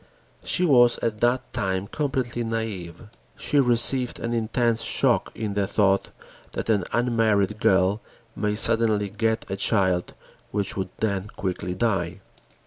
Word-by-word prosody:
She 180 - +2
was 120 -6 +5
at 110 -2 -1
that 120 +2 0
time 95 -5 -1
completely 130 -2 -2
naïve. 110 -4 -5 0.3
She 145 - +1
received 125 0 +2
an 115 0 -3
intense 115 0 0
shock - - +1
in 105 -2 -3
the 100 -1 0
thought 100 -2 +1 0.4
that - - -2
an 100 -4 +1
unmarried 110 -4 +1
girl 95 +2 +2 0.3
may 105 0 -1
suddenly 110 -2 +4
get 110 +2 -1
a 95 - -3
child 95 -3 0 0.3
which 100 -2 -2
would 95 -1 -3
then 100 -2 -1
quickly 90 -3 -4
die. 95 -4 -1
110 Hz, 135 wpm, -24 LUFS, 95-120 Hz, 0.4 s, was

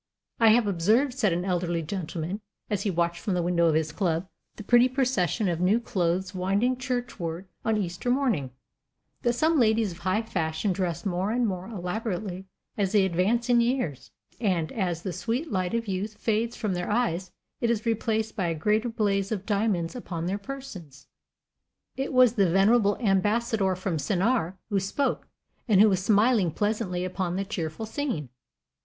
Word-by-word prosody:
"I 230 - +5
have 225 +1 +5
observed," 215 +9 +2
said 230 -7 +1
an 175 +2 -1
elderly 175 -2 -1
gentleman, 175 +2 -4 0.3
as 205 -2 0
he 200 - 0
watched 170 -1 0
from 195 - -1
the 175 - 0
window 170 -1 +2
of 160 - +3
his 160 0 0
club 170 -1 -1 0.3
the - - -8
pretty 240 +4 +5
procession 240 - +1
of 170 -2 -1
new 195 +6 +3
clothes 185 -4 -1
winding 200 +7 +1
churchward 230 -9 -3 0.2
on 225 -1 +1
Easter 180 +3 -3
morning, 245 - +1 0.7
"that 240 - +2
some 310 +5 +2
ladies 220 -3 +3
of 170 - -11
high 185 +5 0
fashion 170 -1 -1
dress 175 -2 -2
more 185 +1 -1
and 240 +2 +1
more 185 -3 -3
elaborately 190 -1 -4 0.3
as 195 -1 +1
they 200 -3 +5
advance 195 +7 +1
in 240 -1 +4
years, 235 - -1 0.3
and 180 -8 0
as 180 -6 -2
the 185 - -3
sweet 250 - -2
light 185 +2 -1
of 230 -1 -2
youth 200 +2 -3
fades 225 +1 0
from 210 -3 -2
their 180 0 -3
eyes 200 -5 0 0.3
it 235 - +1
is 230 -1 0
replaced 220 -1 0
by 190 -5 0
a 165 - -1
greater 215 +8 +1
blaze 200 -3 0
of 200 -3 -3
diamonds 200 -5 0
upon 170 -9 -5
their 195 +3 -1
persons." 195 - -9 0.9
It 270 +1 -3
was 255 -3 +5
the 200 -6 +3
venerable 205 +3 +4
Ambassador 205 -1 +1
from 185 -2 -2
Sennaar 190 - 0
who 200 - +2
spoke, 200 +9 -1 0.4
and 205 -5 +4
who 215 +1 +7
was 185 -2 0
smiling 210 -1 +4
pleasantly 195 0 -1
upon 185 -1 -2
the 195 +1 -1
cheerful 175 -1 -4
scene. 220 - -3
200 Hz, 175 wpm, -27 LUFS, 180-230 Hz, 0.9 s, who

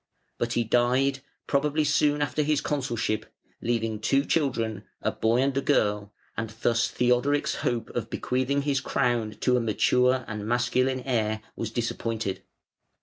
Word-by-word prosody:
But 120 0 -1
he 120 - +2
died, 125 +4 +2 0.3
probably 150 +2 +1
soon 150 0 +2
after 145 +1 -1
his 150 -1 +2
consulship, 120 -6 -2 0.3
leaving 115 -2 -1
two 135 +6 +2
children 115 - 0 0.2
a - - 0
boy 115 +3 +2
and 135 0 0
a 140 - +1
girl, 105 -7 +1 0.2
and 115 -1 -3
thus 120 0 +3
Theodoric's 125 +4 +1
hope 120 -3 -2
of - - -3
bequeathing 130 +3 0
his 140 -1 +1
crown 120 -5 0
to 125 -1 +3
a - - +1
mature 125 +3 +2
and 105 -2 -5
masculine 125 +2 +1
heir 110 -4 -1
was 115 - -3
disappointed. 115 -3 -2
120 Hz, 145 wpm, -27 LUFS, 115-140 Hz, 0.3 s, thus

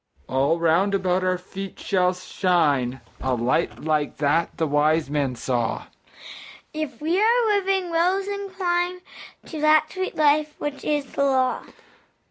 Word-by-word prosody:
All 140 +5 +1
round 170 +5 +2
about 185 -1 0
our 185 0 +1
feet 190 +1 -8
shall 180 -1 +1
shine 150 -9 0 0.2
A 130 -1 0
light 125 +8 0
like 155 -1 0
that 150 +4 0
the 160 - +1
wise 150 0 +1
men 140 -4 0
saw, 120 -1 -2 0.9
If 305 -5 -5
we 345 +5 +1
our 470 +2 +4
living 385 -3 +1
wills 365 +4 +1
incline 365 -3 -2 0.4
To 315 -2 -7
that 310 0 +4
sweet 375 0 -3
Life 300 0 +2
which 295 -1 -5
is 295 -2 0
the 275 - -2
Law. 260 -2 +1
195 Hz, 140 wpm, -23 LUFS, -, 0.9 s, our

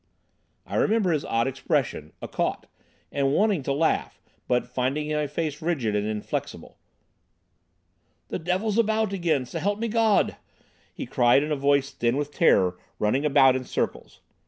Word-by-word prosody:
I - - -4
remember 210 -4 +2
his 150 -3 0
odd 115 0 0
expression 135 - -2
"a - - -3
caught," - - -2 0.5
and 140 -1 +1
wanting 205 -2 +2
to 135 - -3
laugh, 155 +4 0 0.3
but 125 0 +1
finding 130 +5 -2
my 150 -1 0
face 150 0 -3
rigid 140 -11 -1
and 105 0 0
inflexible. 105 -1 -5 1.5
"The - - -3
devil's 190 +6 0
about 220 -2 +1
again, 165 -8 0
s'help 200 +10 -2
me 230 +2 -2
Gawd!" 225 -2 +2 0.5
he - - -6
cried, 120 +3 +3
in 155 - -4
a - - +2
voice 140 0 +1
thin 120 0 0
with 145 0 -2
terror, 90 - +3 0.2
running 125 +8 +1
about 135 -3 +5
in 130 - -2
circles. - - -4
145 Hz, 155 wpm, -25 LUFS, 130-175 Hz, 1.5 s, about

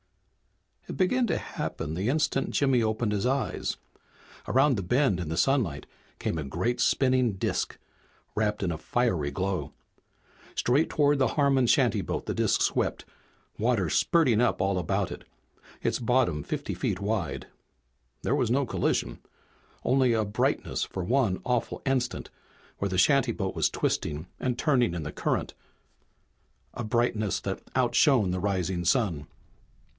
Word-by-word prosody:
It - - -6
began 235 +6 +2
to - - 0
happen 75 - -4
the 95 +7 -1
instant 140 -1 +1
Jimmy 135 -4 +2
opened 110 0 0
his 105 0 -1
eyes. 135 -3 -1 0.7
Around 135 +1 +3
the 100 - -2
bend 125 - +2
in 85 -4 -4
the 80 - -3
sunlight 115 - +1 0.3
came 80 - -2
a - - -3
great 95 - -1
spinning 130 -4 +3
disk, 95 - -2 0.6
wrapped 105 -1 0
in 90 - 0
a 80 - -4
fiery 95 -13 0
glow. 95 +6 -3 0.8
Straight 140 +7 +2
toward 145 -2 +2
the 130 - +3
Harmon 135 -3 +3
shantyboat - - +1
the - - -2
disk - - +1
swept, - - 0 0.5
water 110 -6 +1
spurting 140 -11 +3
up 120 - +2
all 95 0 +1
about 85 - -1
it, - - -8 0.6
its - - 0
bottom 120 - +1
fifty - - -4
feet 90 - -2
wide. 95 - -2 0.8
There - - +1
was - - +1
no 140 +2 +2
collision. - - -1 0.6
Only 130 -1 +3
a 110 -1 +1
brightness 105 +1 -1
for 95 - -5
one 115 -2 +1
awful 125 -1 -1
instant 130 -2 -1 0.5
where 100 - -1
the 95 - -2
shantyboat 115 -4 +2
was - - +2
twisting 75 +1 -2
and 125 -2 -1
turning 125 - +2
in 85 - -3
the 75 - -5
current, - - -1 1.2
a 120 - -5
brightness 110 -2 0
that 95 -1 -4
outshone 125 - +3
the 90 - -1
rising 95 -3 -1
sun. 85 - +1
115 Hz, 145 wpm, -27 LUFS, 95-130 Hz, 1.2 s, Around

